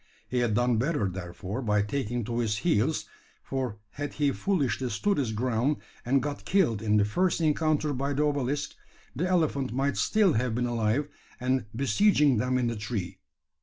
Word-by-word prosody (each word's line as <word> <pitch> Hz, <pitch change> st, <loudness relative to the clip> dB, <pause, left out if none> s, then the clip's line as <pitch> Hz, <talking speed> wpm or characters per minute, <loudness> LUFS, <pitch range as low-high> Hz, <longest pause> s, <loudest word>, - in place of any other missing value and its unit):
He 125 Hz, -, -1 dB
had 120 Hz, -3 st, +1 dB
done 120 Hz, 0 st, +2 dB
better, 130 Hz, -3 st, +1 dB
therefore, 95 Hz, +5 st, -5 dB
by 105 Hz, -4 st, +2 dB
taking 120 Hz, +1 st, -2 dB
to 120 Hz, +2 st, -2 dB
his 110 Hz, -3 st, 0 dB
heels; 155 Hz, -2 st, +2 dB, 0.4 s
for 130 Hz, -6 st, -3 dB
had 145 Hz, +1 st, -5 dB
he 145 Hz, -2 st, +1 dB
foolishly 135 Hz, -, 0 dB
stood 195 Hz, -, 0 dB
his 125 Hz, -5 st, 0 dB
ground, 125 Hz, +5 st, 0 dB, 0.3 s
and 130 Hz, +1 st, +2 dB
got 145 Hz, -1 st, -4 dB
killed 160 Hz, -, +2 dB
in 105 Hz, -1 st, +2 dB
the 100 Hz, -, +4 dB
first 175 Hz, -, +1 dB
encounter 155 Hz, -1 st, +1 dB
by 140 Hz, +2 st, -1 dB
the 145 Hz, +2 st, +1 dB
obelisk, 145 Hz, -1 st, -1 dB, 0.4 s
the 175 Hz, +7 st, 0 dB
elephant 155 Hz, -7 st, +1 dB
might 135 Hz, +3 st, 0 dB
still 210 Hz, -6 st, +3 dB
have 120 Hz, 0 st, 0 dB
been 125 Hz, 0 st, 0 dB
alive, 120 Hz, +4 st, 0 dB, 0.3 s
and 130 Hz, -2 st, 0 dB
besieging 140 Hz, -, +3 dB
them 125 Hz, +3 st, +1 dB
in 125 Hz, -, +1 dB
the 115 Hz, 0 st, -1 dB
tree. 105 Hz, -3 st, -4 dB
125 Hz, 175 wpm, -28 LUFS, 110-145 Hz, 0.4 s, the